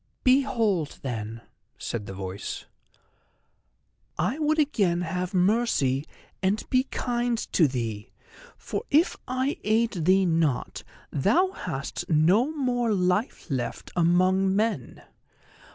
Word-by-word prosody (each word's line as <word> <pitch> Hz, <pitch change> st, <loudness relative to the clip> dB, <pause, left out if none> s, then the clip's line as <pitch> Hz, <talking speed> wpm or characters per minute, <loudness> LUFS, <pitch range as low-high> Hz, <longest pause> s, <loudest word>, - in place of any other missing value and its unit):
"Behold 230 Hz, -, +2 dB
then," 115 Hz, -3 st, -4 dB, 0.4 s
said 110 Hz, -3 st, -4 dB
the -, -, -6 dB
voice, 95 Hz, 0 st, -5 dB, 1.5 s
"I 200 Hz, -, 0 dB
would 310 Hz, 0 st, +2 dB
again 205 Hz, -, +2 dB
have 180 Hz, +2 st, -3 dB
mercy 180 Hz, -, +2 dB, 0.3 s
and 195 Hz, +3 st, 0 dB
be 255 Hz, +1 st, +3 dB
kind 240 Hz, -2 st, -1 dB, 0.2 s
to 165 Hz, -, +5 dB
thee, 115 Hz, -5 st, -4 dB, 0.5 s
for -, -, -4 dB
if 310 Hz, +5 st, +3 dB
I 260 Hz, +2 st, -1 dB
aid 225 Hz, +2 st, +2 dB
thee 190 Hz, +1 st, +5 dB
not 160 Hz, -6 st, 0 dB, 0.3 s
thou 245 Hz, -, +2 dB
hast 140 Hz, -, -5 dB
no 180 Hz, -, +4 dB
more 250 Hz, -6 st, 0 dB
life 185 Hz, +5 st, 0 dB
left 125 Hz, -3 st, -3 dB
among 185 Hz, +3 st, +3 dB
men. 210 Hz, -, -1 dB
190 Hz, 110 wpm, -26 LUFS, 150-240 Hz, 1.5 s, to